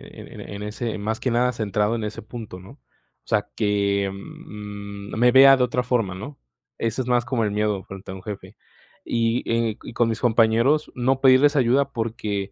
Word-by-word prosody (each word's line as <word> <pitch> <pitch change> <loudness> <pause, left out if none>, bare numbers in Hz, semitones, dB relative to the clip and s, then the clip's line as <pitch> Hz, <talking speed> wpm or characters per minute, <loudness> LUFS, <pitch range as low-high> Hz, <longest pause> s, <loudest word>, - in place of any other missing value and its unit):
eh, - - -11
en - - -8
en 100 0 -7
ese 110 +2 -4
más 110 +2 -2
que 130 - 0
nada 125 +2 +2
centrado 105 0 0
en 115 - -3
ese 105 0 -5
punto, 110 -3 -9
¿no? 95 +5 -13
O 140 - -25
sea - - +1
que, 100 -1 +1
mm, 100 0 -9
me 125 +2 +5
vea 135 +1 +8
de 125 - +2
otra 125 0 0
forma, 120 -7 0
¿no? 140 +10 -8 0.4
Eso 115 +3 -1
es 125 - -6
más 120 -1 +2
como 120 -3 -1
el - - 0
miedo 105 -1 0
frente 95 0 -9
a - - -6
un 95 - -10
jefe. 100 -1 -8 0.5
Y, 115 +1 0
eh, 115 -2 0
y - - -9
con 120 0 +2
mis 110 0 -2
compañeros, 120 +5 +2
no 130 +2 +1
pedirles 135 +3 +5
ayuda, 135 +1 +2
porque, 110 -4 -3
115 Hz, 200 wpm, -23 LUFS, 105-125 Hz, 0.5 s, vea